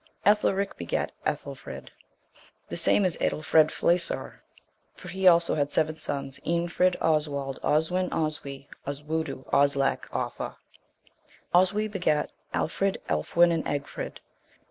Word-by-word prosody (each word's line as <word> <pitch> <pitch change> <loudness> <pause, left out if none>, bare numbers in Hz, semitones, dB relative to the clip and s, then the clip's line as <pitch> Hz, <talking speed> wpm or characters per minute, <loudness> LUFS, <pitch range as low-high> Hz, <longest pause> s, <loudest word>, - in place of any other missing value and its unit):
Ethelric 200 -1 +2
begat - - -2 0.2
Ethelfrid: - - -5 0.8
the - - -4
same 200 - +3
is 180 - +1
Aedlfred 155 0 +3
Flesaur. 170 +1 0 0.6
For - - -10
he 190 0 +1
also 170 -1 +6
had 145 -1 0
seven 155 0 +1
sons, 140 -2 -2
Eanfrid, 170 +3 +1
Oswald, 145 -4 0
Oswin, 180 +4 +1
Oswy, 140 -3 -3 0.2
Oswudu, 150 0 -3
Oslac, 140 -1 +2
Offa. - - -4 1.0
Oswy 190 +4 +3
begat 175 -7 0 0.2
Alfrid, 195 +4 0
Elfwin, 170 - +3
and 165 -1 0
Egfrid. 145 -1 -4
160 Hz, 110 wpm, -27 LUFS, 145-180 Hz, 1.0 s, also